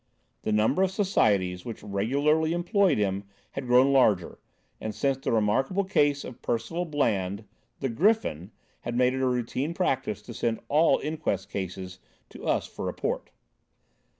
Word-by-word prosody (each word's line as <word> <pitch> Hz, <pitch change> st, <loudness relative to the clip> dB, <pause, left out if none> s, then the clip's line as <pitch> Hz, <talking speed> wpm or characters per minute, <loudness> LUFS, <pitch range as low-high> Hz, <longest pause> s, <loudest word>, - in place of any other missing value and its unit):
The -, -, -2 dB
number 110 Hz, -, +2 dB
of 190 Hz, -, +3 dB
societies 100 Hz, -, +1 dB
which 115 Hz, -2 st, -7 dB
regularly 140 Hz, +11 st, +1 dB
employed 180 Hz, -1 st, +2 dB
him 100 Hz, -1 st, -1 dB, 0.3 s
had 135 Hz, -2 st, -5 dB
grown 125 Hz, +3 st, +5 dB
larger, 105 Hz, -10 st, +3 dB, 0.4 s
and, 110 Hz, -1 st, -5 dB
since 135 Hz, +4 st, +1 dB
the -, -, -2 dB
remarkable 125 Hz, -, +2 dB
case 145 Hz, -7 st, +2 dB
of 125 Hz, -, -9 dB
Percival 120 Hz, +10 st, -2 dB
Bland, 105 Hz, -, 0 dB, 0.4 s
the 135 Hz, -, 0 dB
Griffin 120 Hz, -, +1 dB, 0.3 s
had 120 Hz, -, -5 dB
made 125 Hz, 0 st, +3 dB
it 130 Hz, -, -2 dB
a 130 Hz, -, +2 dB
routine 125 Hz, +6 st, -1 dB
practice 130 Hz, -, -1 dB
to 120 Hz, -, -9 dB
send 115 Hz, 0 st, -1 dB
all 155 Hz, +3 st, +4 dB
inquest 150 Hz, -, -2 dB
cases 95 Hz, -1 st, -5 dB, 0.3 s
to -, -, -11 dB
us -, -, +1 dB
for -, -, -8 dB
report. -, -, -3 dB
125 Hz, 150 wpm, -27 LUFS, 105-150 Hz, 0.4 s, grown